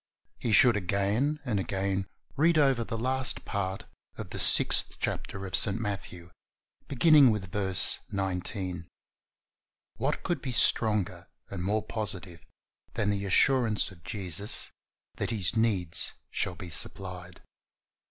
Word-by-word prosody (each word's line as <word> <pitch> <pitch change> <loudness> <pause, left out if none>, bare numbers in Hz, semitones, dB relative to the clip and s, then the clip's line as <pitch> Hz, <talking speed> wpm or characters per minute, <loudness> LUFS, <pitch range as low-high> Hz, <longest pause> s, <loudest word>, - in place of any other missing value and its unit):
He 115 - -2
should 120 +2 +6
again 105 - 0
and 110 -6 -1
again 95 0 -2 0.3
read 160 +3 +3
over 135 -5 +3
the 115 0 -5
last 130 +2 -1
part 95 -1 -3 0.3
of - - -8
the - - -4
sixth - - +4
chapter 95 -1 -4
of 95 - -1
St. 105 0 +2
Matthew, 95 -5 -6 0.6
beginning 145 0 +6
with 100 -5 -2
verse 95 -2 +1
19. 95 -2 -4 1.1
What 135 +6 -2
could 175 -7 -2
be 130 - -4
stronger 105 -4 +1 0.2
and 95 -3 -4
more 105 +3 0
positive 95 -6 -4 0.5
than 105 -1 0
the 100 0 -2
assurance 115 +1 +3
of 85 -2 -17
Jesus 100 +1 0 0.5
that - - -1
his 105 -5 +1
needs 100 -7 0 0.2
shall 90 - -1
be 85 +1 -9
supplied? 90 +2 -3
100 Hz, 130 wpm, -28 LUFS, 95-115 Hz, 1.1 s, should